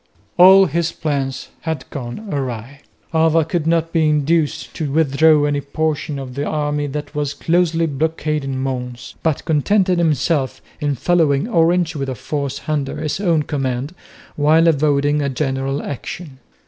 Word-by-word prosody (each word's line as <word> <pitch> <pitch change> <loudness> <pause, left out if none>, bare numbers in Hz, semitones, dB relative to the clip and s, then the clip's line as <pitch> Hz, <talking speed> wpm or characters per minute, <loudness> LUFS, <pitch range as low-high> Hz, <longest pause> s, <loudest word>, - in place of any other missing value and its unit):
All 190 +2 +8
his 170 0 -1
plans 135 -4 -3
had 160 -5 -4
gone 135 - -6
awry. 130 0 -4 0.3
Alva 160 0 +3
could 165 -1 -2
not 165 0 +1
be 160 -2 +3
induced 155 +1 0
to 150 -4 -2
withdraw 155 0 +4
any 145 -1 0
portion 155 +1 -2
of 130 -2 -7
the 140 +2 -3
army 145 -1 -1
that 150 +1 -5
was 145 -1 -2
closely 165 +1 +1
blockading 150 -2 -2
Mons, 125 -2 -4
but 160 -3 -1
contented 180 +4 +2
himself 150 -3 +1 0.2
in 145 -2 0
following 155 - +2
Orange 170 -4 +2
with 135 -2 -3
a 130 - -3
force 140 +3 -4
under 150 -3 -1
his 155 +3 -3
own 170 -6 +2
command 135 0 -3 0.4
while 155 +3 +4
avoiding 145 -1 +2
a 140 - 0
general 135 0 -2
action. 145 +1 -7
150 Hz, 150 wpm, -19 LUFS, 140-160 Hz, 0.4 s, All